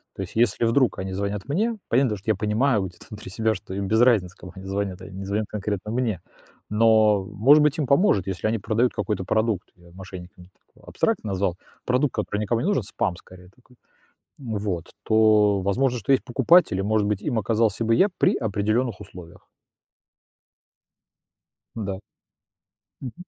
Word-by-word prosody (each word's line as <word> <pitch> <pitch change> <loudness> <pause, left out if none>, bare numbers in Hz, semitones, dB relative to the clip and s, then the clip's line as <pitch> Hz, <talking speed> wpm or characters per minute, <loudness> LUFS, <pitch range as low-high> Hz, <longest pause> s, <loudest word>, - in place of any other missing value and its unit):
То - - -6
есть - - -10
если 115 0 +2
вдруг 120 -1 +2
они 95 0 -4
звонят 100 0 -3
мне, 215 +10 0
понятно 130 +1 +2
дело, 105 - -3
что 110 +3 -1
я - - +1
понимаю 105 +3 +1
вот 95 - -6
это - - -14
внутри 105 -3 -9
себя 110 +2 0
что 95 - -9
им 100 0 -3
без 110 +3 +2
разницы, 105 -8 +3
кому 90 - -11
они 95 0 -10
звонят, 95 -1 -3
а, - - -9
они 95 0 -10
не 95 - -6
звонят 105 +2 -1
конкретно 105 0 -4
мне. 115 -7 -1 0.5
Но, 110 -2 +4
может 120 +10 +4
быть, 150 0 +2
им 150 - 0
поможет, 140 - +3
если 95 +3 -2
они 115 +1 0
продают 115 +4 0
какой-то 105 -4 -2
продукт, 110 -1 -1
я 85 -1 -19
мошенниками 90 -1 -11 0.3
так - - -21
абстрактно 110 - -1
назвал, 95 -2 -1 0.3
продукт, 130 +2 +1
который 105 -1 -3
никому 115 +2 0
не 180 - -1
нужен, 200 - +1
спам 95 -1 -2
скорее 90 0 -15
такой. 125 0 -25 0.6
М, 115 -5 -5
вот 90 -5 -4
то, 105 -2 +4
возможно, 120 +6 0
что 115 +6 0
есть 130 - +2
покупатель, 125 - +3
и, - - 0
может 105 0 +1
быть, 105 -1 -1
им 120 -6 -1
оказался 110 +1 0
бы 115 +1 +3
я 195 - +4
при - - +3
определённых 110 +1 -1
условиях. 90 -4 -12 2.4
Н-да. 100 -3 -4 1.0
Мгм. 130 -3 -6
105 Hz, 185 wpm, -24 LUFS, 95-120 Hz, 2.4 s, Но